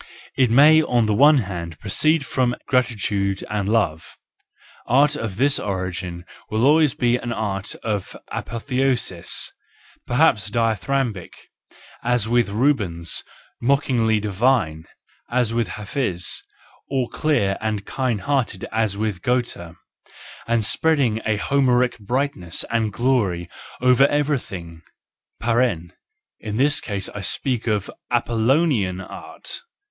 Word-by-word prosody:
It 130 Hz, -3 st, +3 dB
may 150 Hz, +6 st, +7 dB
on 120 Hz, -6 st, +2 dB
the 110 Hz, -, +1 dB
one 145 Hz, +7 st, +6 dB
hand 85 Hz, -3 st, -6 dB
proceed 150 Hz, +9 st, +1 dB
from 125 Hz, -2 st, 0 dB
gratitude 105 Hz, -6 st, 0 dB
and 100 Hz, -2 st, -1 dB
love:—art 115 Hz, -, -1 dB
of 110 Hz, -9 st, -4 dB
this 140 Hz, +3 st, +3 dB
origin 90 Hz, -2 st, -4 dB, 0.2 s
will 110 Hz, +3 st, +1 dB
always 150 Hz, 0 st, +4 dB
of -, -, -34 dB, 1.3 s
a -, -, -2 dB
P°theosis, 125 Hz, -6 st, -1 dB, 0.6 s
perhaps 120 Hz, -7 st, +3 dB
dithyrambic, 115 Hz, -2 st, -1 dB, 0.7 s
as 120 Hz, -2 st, +1 dB
with 120 Hz, -2 st, +2 dB
Rubens, 100 Hz, -, +1 dB, 0.4 s
mocking 130 Hz, -3 st, +2 dB
divinely, 105 Hz, -6 st, +1 dB, 0.4 s
as 120 Hz, -2 st, +1 dB
with 115 Hz, -2 st, 0 dB
Hafiz 100 Hz, -, -2 dB, 0.5 s
or 130 Hz, -3 st, 0 dB
clear 110 Hz, -12 st, +1 dB
and 105 Hz, -2 st, -2 dB
kind 125 Hz, -6 st, -1 dB
hearted 120 Hz, -5 st, -1 dB
as 110 Hz, -3 st, 0 dB
with 105 Hz, -4 st, -2 dB
Goethe, 120 Hz, -9 st, -2 dB, 0.7 s
and 115 Hz, -2 st, +2 dB
spread 160 Hz, +8 st, +2 dB
mg 115 Hz, -5 st, +1 dB
a 110 Hz, -1 st, +1 dB
Homeric 125 Hz, 0 st, +2 dB
brightness 110 Hz, -5 st, -2 dB
and 115 Hz, -2 st, +1 dB
glory 100 Hz, -8 st, 0 dB, 0.3 s
over 125 Hz, +2 st, +5 dB
every 145 Hz, 0 st, +1 dB
mg 90 Hz, +2 st, -4 dB, 0.5 s
(in 105 Hz, -1 st, -4 dB
this 145 Hz, +4 st, +3 dB
case 100 Hz, -3 st, -4 dB
I 105 Hz, -, -7 dB
speak 120 Hz, +5 st, -1 dB
of 105 Hz, -3 st, 0 dB, 0.2 s
Apollonian 120 Hz, -, +1 dB
art). -, -, -8 dB
115 Hz, 110 wpm, -22 LUFS, 100-130 Hz, 1.3 s, may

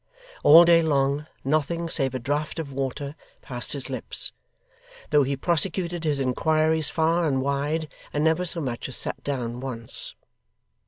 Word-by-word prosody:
All 165 Hz, +3 st, +9 dB
day 170 Hz, -1 st, +6 dB
long, 145 Hz, -1 st, 0 dB, 0.2 s
nothing, 155 Hz, +4 st, 0 dB
save 135 Hz, -6 st, -1 dB
a -, -, -2 dB
draught 145 Hz, +6 st, -3 dB
of 150 Hz, -4 st, -5 dB
water, 140 Hz, +2 st, -4 dB, 0.3 s
passed 125 Hz, -2 st, -2 dB
his 140 Hz, -2 st, -4 dB
lips; 130 Hz, -4 st, 0 dB, 0.8 s
though 150 Hz, -1 st, +5 dB
he 140 Hz, 0 st, 0 dB
prosecuted 170 Hz, +2 st, -1 dB
his 145 Hz, -2 st, 0 dB
inquiries 155 Hz, +4 st, +1 dB
far 165 Hz, +1 st, +1 dB
and 135 Hz, -3 st, 0 dB
wide, 145 Hz, +4 st, -1 dB, 0.2 s
and 150 Hz, -, -1 dB
never 160 Hz, +3 st, +2 dB
so 175 Hz, -1 st, +1 dB
much 125 Hz, -2 st, -4 dB
as 130 Hz, -, +1 dB
sat -, -, +1 dB
down, 125 Hz, -4 st, -3 dB
once. 120 Hz, -3 st, -1 dB
145 Hz, 155 wpm, -25 LUFS, 135-160 Hz, 0.8 s, All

